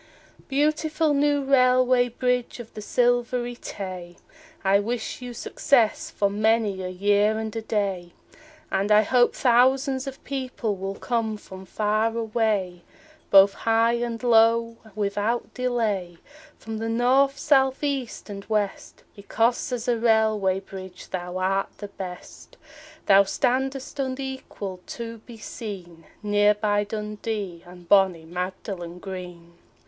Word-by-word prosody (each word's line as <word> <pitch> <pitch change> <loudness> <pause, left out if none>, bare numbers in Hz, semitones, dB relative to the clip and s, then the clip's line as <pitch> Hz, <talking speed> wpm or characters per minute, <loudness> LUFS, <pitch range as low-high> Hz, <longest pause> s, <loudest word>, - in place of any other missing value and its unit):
Beautiful 305 +2 +1
new 290 0 +2
railway 255 -2 +4
bridge 250 0 -1
of 235 -2 -10
the 215 - -7
Silvery 245 +1 +1
Tay, 185 -6 -7 0.5
I 195 +1 +4
wish 230 +3 -3
you 250 -1 -6
success 240 0 +1
for 200 - 0
many 210 -1 +1
a 185 - -4
year 205 +3 +2
and 220 -1 -4
a 225 - -2
day, 195 -5 -2 0.6
And 195 +2 0
I 210 +1 +6
hope 245 +3 +3
thousands 260 +2 +3
of 270 0 -8
people 255 -6 -3
will 195 +1 -5
come 225 -2 -2
from 190 -2 -12
far 215 +3 0
away, 215 -6 -1 0.5
Both 195 0 +7
high 230 +1 +2
and 235 0 -3
low 230 0 +4 0.2
without 210 +3 -1
delay, 215 -9 -1 0.4
From 220 -1 -6
the 225 0 -2
North, 260 +4 +3
South, 270 -2 +2
East 275 -5 -3
and 200 -2 -7
West, 210 -3 -3
Because 230 +5 0
as 245 -2 -3
a 240 -2 +1
railway 215 -4 +2
bridge 190 -1 -10
thou 180 0 -4
art 195 +1 -1
the 205 - -7
best; 185 -2 -9 0.5
Thou 195 0 +7
standest 265 +7 -1
unequalled 260 -8 -5
to 230 -1 -6
be 235 -2 -10
seen 185 -8 -8 0.2
Near 205 0 +3
by 205 -1 0
Dundee 210 -3 -4
and 175 -1 -14
bonnie 190 -4 +4
Magdalen 180 0 -5
Green. 180 -2 -9
220 Hz, 130 wpm, -25 LUFS, 195-245 Hz, 0.6 s, Both